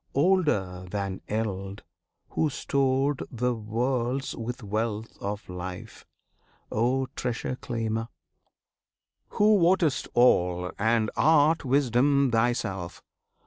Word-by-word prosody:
Older 135 Hz, -, +1 dB
than 100 Hz, -1 st, -3 dB
eld, 100 Hz, -2 st, -3 dB, 0.5 s
Who 160 Hz, -, 0 dB
stored 135 Hz, 0 st, 0 dB
The 125 Hz, +1 st, -1 dB
worlds 120 Hz, +4 st, -2 dB
with 120 Hz, +1 st, -5 dB
wealth 110 Hz, +1 st, -3 dB
of 105 Hz, +1 st, -4 dB
life! 90 Hz, 0 st, -8 dB, 0.6 s
O 125 Hz, +4 st, +1 dB
Treasure 125 Hz, +1 st, -3 dB
Claimer, 115 Hz, -3 st, -3 dB, 1.3 s
Who 210 Hz, 0 st, +5 dB
wottest 175 Hz, -4 st, +2 dB
all, 90 Hz, -7 st, +3 dB
and 110 Hz, 0 st, +2 dB
art 155 Hz, +1 st, +4 dB
Wisdom 135 Hz, +1 st, +3 dB
Thyself! 115 Hz, -6 st, -1 dB
120 Hz, 95 wpm, -27 LUFS, 105-135 Hz, 1.3 s, Who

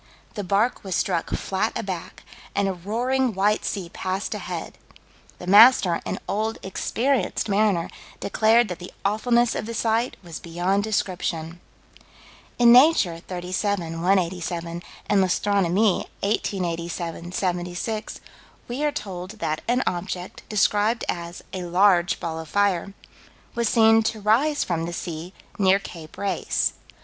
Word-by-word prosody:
The 205 Hz, -, -4 dB
bark 200 Hz, +6 st, +1 dB
was 190 Hz, -3 st, -3 dB
struck 175 Hz, -2 st, 0 dB
flat 195 Hz, +4 st, -1 dB
aback, 185 Hz, -4 st, -6 dB, 0.3 s
and 200 Hz, 0 st, +2 dB
"a 195 Hz, -, 0 dB
roaring, 235 Hz, +6 st, -1 dB
white 205 Hz, +2 st, +2 dB
sea 195 Hz, -4 st, -3 dB
passed 190 Hz, +2 st, -3 dB
ahead." -, -, -6 dB, 0.6 s
"The -, -, -9 dB
master, 200 Hz, -3 st, +7 dB
an -, -, -2 dB
old, 220 Hz, +2 st, -1 dB
experienced 230 Hz, +5 st, -1 dB
mariner, 200 Hz, -4 st, +2 dB, 0.3 s
declared 225 Hz, +3 st, +3 dB
that 180 Hz, 0 st, -5 dB
the 180 Hz, -, -9 dB
awfulness 235 Hz, +3 st, +2 dB
of 215 Hz, -, -4 dB
the 230 Hz, -, -5 dB
sight 230 Hz, +2 st, 0 dB
was 170 Hz, -2 st, -7 dB
beyond 180 Hz, +4 st, 0 dB
description." 175 Hz, -5 st, -2 dB, 1.0 s
In 240 Hz, -1 st, +7 dB
Nature, 245 Hz, -, +5 dB
37 180 Hz, -1 st, -3 dB
187, 175 Hz, -2 st, 0 dB, 0.3 s
and 205 Hz, -2 st, +3 dB
L'Astronomie; 195 Hz, +1 st, +2 dB
1887 175 Hz, -4 st, -2 dB
76, 180 Hz, +4 st, -3 dB, 0.5 s
we 250 Hz, +5 st, -3 dB
are 300 Hz, -, +2 dB
told 190 Hz, -8 st, -6 dB
that 155 Hz, -7 st, -2 dB
an 250 Hz, +2 st, +2 dB
object, 180 Hz, 0 st, -4 dB
described 210 Hz, +2 st, +2 dB
as 170 Hz, 0 st, -4 dB
"a 185 Hz, -, -3 dB
large 175 Hz, 0 st, +3 dB
ball 160 Hz, -1 st, -4 dB
of 160 Hz, -2 st, -8 dB
fire," 200 Hz, -1 st, +1 dB, 0.6 s
was 235 Hz, -2 st, 0 dB
seen 225 Hz, -1 st, +5 dB
to 220 Hz, 0 st, -2 dB
rise 255 Hz, +9 st, +2 dB
from 165 Hz, -2 st, -2 dB
the 170 Hz, -, -5 dB
sea, 170 Hz, 0 st, -5 dB, 0.3 s
near 190 Hz, -1 st, +5 dB
Cape 165 Hz, -5 st, -10 dB
Race. 200 Hz, -1 st, 0 dB
195 Hz, 135 wpm, -24 LUFS, 175-220 Hz, 1.0 s, master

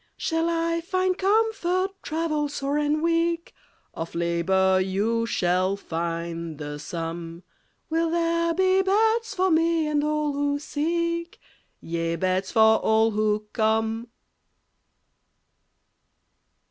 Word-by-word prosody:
Shall 325 Hz, -1 st, 0 dB
I 335 Hz, 0 st, 0 dB
find 370 Hz, +1 st, 0 dB
comfort, 390 Hz, -2 st, +1 dB
travel 305 Hz, -2 st, -1 dB
sore 285 Hz, 0 st, -2 dB
and 300 Hz, +1 st, 0 dB
weak? 335 Hz, 0 st, 0 dB, 0.4 s
Of 165 Hz, +1 st, -6 dB
labor 185 Hz, +3 st, +2 dB
you 215 Hz, +5 st, 0 dB
shall 185 Hz, -1 st, +1 dB
find 170 Hz, -2 st, -4 dB
the 145 Hz, 0 st, -6 dB
sum. 165 Hz, +2 st, -6 dB, 0.4 s
Will 330 Hz, +1 st, 0 dB
there 335 Hz, 0 st, +1 dB
be 375 Hz, +1 st, +3 dB
beds 440 Hz, +4 st, +1 dB
for 375 Hz, 0 st, +2 dB
me 330 Hz, 0 st, +2 dB
and 295 Hz, -1 st, +1 dB
all 300 Hz, -1 st, 0 dB
who 285 Hz, 0 st, 0 dB
seek? 335 Hz, +3 st, -2 dB, 0.4 s
Yea, 165 Hz, 0 st, -2 dB
beds 185 Hz, +1 st, 0 dB
for 220 Hz, -1 st, +5 dB
all 220 Hz, +1 st, +3 dB
who 210 Hz, 0 st, 0 dB
come. 220 Hz, +1 st, 0 dB
290 Hz, 110 wpm, -25 LUFS, -, 0.4 s, for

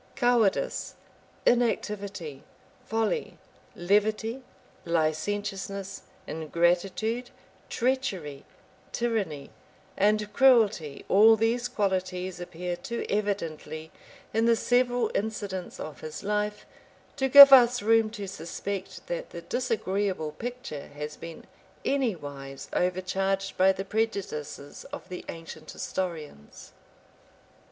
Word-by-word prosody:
Cowardice, 240 Hz, -6 st, +1 dB, 0.5 s
inactivity, 200 Hz, -, 0 dB, 0.5 s
folly, 225 Hz, -, -1 dB, 0.4 s
levity 215 Hz, +6 st, +1 dB, 0.4 s
licentiousness, 195 Hz, +4 st, -2 dB, 0.2 s
ingratitude, 180 Hz, +9 st, 0 dB, 0.4 s
treachery, 195 Hz, -, -1 dB, 0.5 s
tyranny, 205 Hz, -12 st, -2 dB, 0.4 s
and 210 Hz, +1 st, +2 dB
cruelty 220 Hz, -, +3 dB
all 220 Hz, +3 st, +7 dB
these 230 Hz, +3 st, +1 dB
qualities 185 Hz, -3 st, -2 dB
appear 175 Hz, 0 st, -4 dB
too 235 Hz, +6 st, -5 dB
evidently 160 Hz, -6 st, -3 dB, 0.4 s
in 225 Hz, +1 st, +2 dB
the 235 Hz, 0 st, +5 dB
several 245 Hz, +1 st, +2 dB
incidents 200 Hz, -3 st, -3 dB
of 155 Hz, -, -7 dB
his 155 Hz, +4 st, -7 dB
life, 210 Hz, +1 st, -1 dB, 0.5 s
to 265 Hz, 0 st, 0 dB
give 280 Hz, +1 st, +12 dB
us 245 Hz, -2 st, +7 dB
room 225 Hz, 0 st, +4 dB
to 205 Hz, -2 st, -6 dB
suspect 190 Hz, +2 st, -6 dB
that -, -, -4 dB
the -, -, -8 dB
disagreeable 195 Hz, -8 st, -1 dB
picture 240 Hz, -, -6 dB
has 150 Hz, +1 st, -5 dB
been 165 Hz, -1 st, -10 dB, 0.4 s
anywise 145 Hz, -, -2 dB
overcharged 190 Hz, +2 st, 0 dB
by 190 Hz, +1 st, +5 dB
the 195 Hz, 0 st, -4 dB
prejudices 190 Hz, -10 st, -3 dB
of -, -, -9 dB
the 180 Hz, -, -6 dB
ancient 165 Hz, -1 st, -9 dB
historians. 160 Hz, -, -6 dB
195 Hz, 95 wpm, -27 LUFS, 170-225 Hz, 0.5 s, give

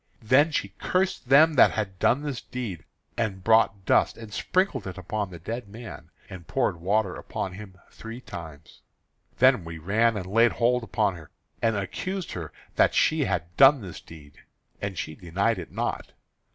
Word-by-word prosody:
Then 135 Hz, +8 st, +5 dB
she 120 Hz, -10 st, -2 dB
cursed 185 Hz, -8 st, -1 dB
them 155 Hz, +4 st, +7 dB
that 135 Hz, -, +7 dB
had 95 Hz, -4 st, -3 dB
done 135 Hz, +5 st, +2 dB
this 140 Hz, -5 st, -4 dB
deed; 105 Hz, -11 st, -6 dB, 0.3 s
and 100 Hz, -5 st, -2 dB
brought 110 Hz, -3 st, +3 dB
dust -, -, +3 dB
and 110 Hz, -2 st, -10 dB
sprinkled 185 Hz, -, 0 dB
it 95 Hz, -, -7 dB
upon 100 Hz, +2 st, -3 dB
the 90 Hz, -, -9 dB
dead 110 Hz, +6 st, -6 dB
man, 115 Hz, +3 st, -10 dB, 0.2 s
and 90 Hz, -4 st, -10 dB
poured -, -, 0 dB
water 100 Hz, +1 st, +1 dB
upon 95 Hz, -, -5 dB
him 95 Hz, -1 st, -11 dB
three 115 Hz, +2 st, -9 dB
times. 80 Hz, -, -10 dB, 0.6 s
Then 130 Hz, -6 st, +5 dB
we 80 Hz, 0 st, -7 dB
ran 105 Hz, +7 st, +1 dB
and 95 Hz, -, -4 dB
laid 115 Hz, +5 st, +3 dB
hold 125 Hz, +1 st, +2 dB
upon 105 Hz, -3 st, 0 dB
her, 80 Hz, -, -13 dB, 0.3 s
and 115 Hz, -1 st, +2 dB
accused 180 Hz, -, -4 dB
her 85 Hz, -4 st, -6 dB, 0.3 s
that -, -, +4 dB
she -, -, +3 dB
had 85 Hz, +2 st, -3 dB
done 135 Hz, -1 st, +7 dB
this 90 Hz, -4 st, -9 dB
deed; 75 Hz, -3 st, -15 dB, 0.4 s
and 100 Hz, -2 st, -4 dB
she 80 Hz, -, -4 dB
denied 95 Hz, +6 st, -1 dB
it 85 Hz, -, -8 dB
not. -, -, -3 dB
105 Hz, 175 wpm, -26 LUFS, 90-120 Hz, 0.6 s, them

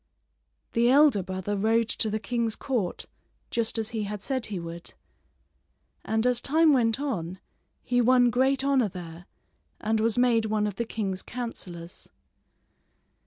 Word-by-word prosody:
The 235 Hz, +1 st, +3 dB
elder 275 Hz, -6 st, +5 dB
brother 190 Hz, +2 st, -3 dB
rode 220 Hz, +3 st, +2 dB
to 220 Hz, -, -1 dB
the 215 Hz, -, -1 dB
king's 230 Hz, -1 st, -1 dB
court 230 Hz, -10 st, -2 dB, 0.5 s
just 230 Hz, 0 st, -1 dB
as 220 Hz, -1 st, -2 dB
he 220 Hz, -2 st, -3 dB
had 205 Hz, 0 st, -6 dB
said 260 Hz, -3 st, -2 dB
he 205 Hz, -, -4 dB
would; 170 Hz, 0 st, -7 dB, 1.1 s
and 220 Hz, +1 st, 0 dB
as 250 Hz, -1 st, +2 dB
time 315 Hz, +1 st, +4 dB
went 230 Hz, -2 st, +2 dB
on 185 Hz, -, -3 dB, 0.5 s
he 245 Hz, 0 st, +2 dB
won 245 Hz, 0 st, +5 dB
great 265 Hz, +2 st, +2 dB
honor 270 Hz, -6 st, +2 dB
there 175 Hz, 0 st, -9 dB, 0.5 s
and 220 Hz, +1 st, 0 dB
was 225 Hz, +1 st, +1 dB
made 240 Hz, -3 st, +3 dB
one 215 Hz, -1 st, 0 dB
of 205 Hz, -2 st, -4 dB
the 235 Hz, -, -1 dB
king's 195 Hz, -4 st, -3 dB
counselors. 180 Hz, -8 st, -7 dB
225 Hz, 150 wpm, -27 LUFS, 200-245 Hz, 1.1 s, elder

